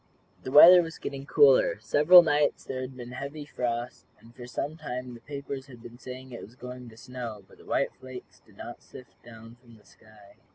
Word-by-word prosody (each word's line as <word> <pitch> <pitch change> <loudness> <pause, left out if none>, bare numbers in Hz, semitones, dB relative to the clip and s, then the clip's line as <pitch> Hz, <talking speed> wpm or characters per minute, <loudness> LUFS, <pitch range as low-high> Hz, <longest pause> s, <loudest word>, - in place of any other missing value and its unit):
The 130 - -7
weather 175 +5 +9
was 165 -1 -8
getting 140 0 -7
cooler. - - +4
Several 175 +5 +6
nights 150 -2 0
there 130 -1 -6
had 130 0 -8
been 120 -1 -9
heavy 140 +4 -7
frosts, 120 -3 -5
and 115 +1 -19
for 120 - -11
some 145 +5 -5
time 125 -5 -7
the 120 - -12
papers 140 +1 -8
had 120 -3 -15
been 120 +1 -13
saying 130 0 -10
that 120 - -9
it - - -11
was 115 - -14
going 125 -1 -10
to 110 - -17
snow, 120 -4 -8
but - - -21
the - - -18
white - - -1
flakes 130 -1 -12
did - - -25
not - - -10
sift 130 - -16
down 115 0 -14
from 115 -2 -19
the 105 - -25
sky. 105 -2 -21
125 Hz, 215 wpm, -27 LUFS, 120-145 Hz, -, weather